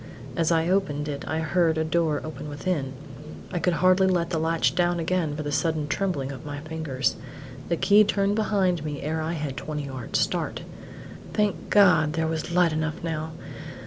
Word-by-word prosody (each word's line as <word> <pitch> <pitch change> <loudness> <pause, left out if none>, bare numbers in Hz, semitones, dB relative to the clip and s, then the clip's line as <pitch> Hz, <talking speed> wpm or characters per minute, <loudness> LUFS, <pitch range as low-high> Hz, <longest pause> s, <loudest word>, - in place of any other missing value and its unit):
As 165 -1 +1
I 165 0 +2
opened 165 -6 0
it 145 -1 -4
I 160 +1 -1
heard 165 0 +2
a 160 - +1
door 160 -2 +1
open 155 -1 -7
within. 145 -2 -2 0.6
I 180 - -1
could 180 +1 +1
hardly 185 +1 +5
let 175 -2 +1
the 165 - 0
latch 165 +1 +1
down 175 -1 +1
again 165 -3 0
for 150 - -4
the 145 - -3
sudden 155 0 0
trembling 150 -5 -1
of 130 -2 -8
my 145 -1 -5
fingers. 155 -4 -2 0.5
The 170 - +1
key 205 +4 +6
turned 200 -1 +1
behind 190 -6 +1
me 150 -2 -4
ere 160 +2 -1
I 160 +2 -2
had 150 -4 -3
twenty 150 +2 -4
yards' 130 -3 -3
start. - - -1 0.7
Thank 210 -2 0
God 180 -7 +5
there 160 0 0
was 160 +1 -2
light 175 -2 +3
enough 155 +2 -2
now! 160 -1 -3
160 Hz, 185 wpm, -25 LUFS, 150-180 Hz, 0.7 s, key